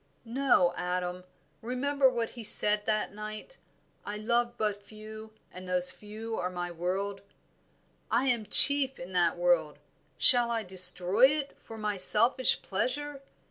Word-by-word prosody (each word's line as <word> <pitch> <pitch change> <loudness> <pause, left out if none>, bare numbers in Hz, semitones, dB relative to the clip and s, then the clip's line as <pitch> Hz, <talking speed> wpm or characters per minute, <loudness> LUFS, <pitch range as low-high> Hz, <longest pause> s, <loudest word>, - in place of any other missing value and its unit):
"No, 230 -8 -1
Adam. 180 0 -6 0.4
Remember 265 +3 -2
what 235 -2 -5
he 235 - -12
said 210 0 +4
that 215 -2 -3
night: 215 - -10 0.4
'I 210 - -8
love 240 +2 -3
but 210 -1 -4
few, 215 +1 -14 0.2
and 185 0 -12
those 180 0 -1
few 215 +4 -10
are 180 - -5
my 175 -1 -7
world,' 190 +4 -6 0.9
I 245 +3 -1
am 235 -5 -3
chief 275 +3 +6
in 180 +2 -12
that 175 -2 -1
world; 175 -4 -2 0.4
shall 245 -3 +6
I 230 -1 -4
destroy 185 +4 +3
it, 285 0 -5
for 225 - -13
my 210 -2 -5
selfish 235 +7 +4
pleasure? 275 +8 -6
215 Hz, 140 wpm, -26 LUFS, 180-240 Hz, 0.9 s, chief